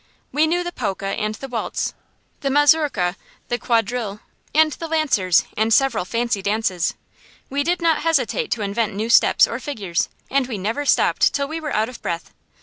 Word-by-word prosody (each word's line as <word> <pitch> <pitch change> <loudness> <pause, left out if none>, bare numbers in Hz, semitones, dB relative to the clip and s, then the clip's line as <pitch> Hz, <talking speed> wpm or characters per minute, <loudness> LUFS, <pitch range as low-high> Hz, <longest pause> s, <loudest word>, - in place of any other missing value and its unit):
We 300 +4 +3
knew 350 +2 +1
the 350 - -4
polka 195 - -3
and 215 +1 -2
the 270 - -8
waltz, 240 -3 -3 0.5
the 275 - -1
mazurka, 285 - +3 0.3
the 240 - -1
quadrille, 225 -3 -1 0.3
and 310 0 +4
the 330 - -6
lancers, 275 - +2
and 220 +1 +1
several 235 -5 +3
fancy 230 -1 -1
dances. 195 -4 0 0.6
We 280 +1 0
did 345 +3 0
not 325 -2 +3
hesitate 330 - 0
to 220 - -4
invent 205 +1 -1
new 220 +3 -2
steps - - +6
or 230 - -4
figures, 205 - -2 0.2
and 270 -2 +2
we 235 -5 -4
never 225 +9 -2
stopped - - +3
till 280 0 0
we 320 +3 -4
were 310 -2 -3
out 215 +1 +1
of 250 -1 -10
breath. 170 -1 -4
240 Hz, 180 wpm, -21 LUFS, 210-290 Hz, 0.6 s, steps